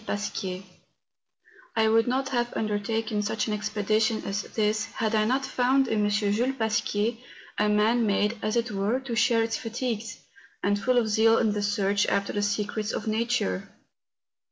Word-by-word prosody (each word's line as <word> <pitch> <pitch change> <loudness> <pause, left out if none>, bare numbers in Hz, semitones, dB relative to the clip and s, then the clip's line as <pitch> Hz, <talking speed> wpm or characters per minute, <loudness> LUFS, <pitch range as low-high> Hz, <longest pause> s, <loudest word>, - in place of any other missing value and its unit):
PASQUIER. 195 -2 -3 1.1
I 220 -1 +3
WOULD 225 +1 +3
not 265 +2 0
have 240 -2 0
undertaken 215 +1 -1
such 215 +1 -1
an 215 - -2
expedition 215 +1 0
as 200 +1 -2
this 215 0 -1
had 220 -1 -3
I 215 -1 +3
not 260 +4 +1
found 260 +1 +2
in 215 -3 +1
M. 205 - +2
Jules 210 +5 +1
Pasquier 220 0 0 0.4
a 210 0 +3
man 220 +2 +3
made, 205 +2 +1
as 215 +2 -1
it 235 0 0
were, 205 +5 0
to 255 -3 -4
share 230 0 +3
its 225 0 -1
fatigues, 230 -1 -4 0.5
and 205 0 +1
full 255 +4 +2
of 235 -2 +3
zeal 225 +1 +4
in 220 - +2
the 210 0 -2
search 205 0 +1
after 200 0 0
the 205 - -1
secrets 210 +1 -1
of - - -3
nature. 220 - -1
220 Hz, 170 wpm, -26 LUFS, 205-230 Hz, 1.1 s, zeal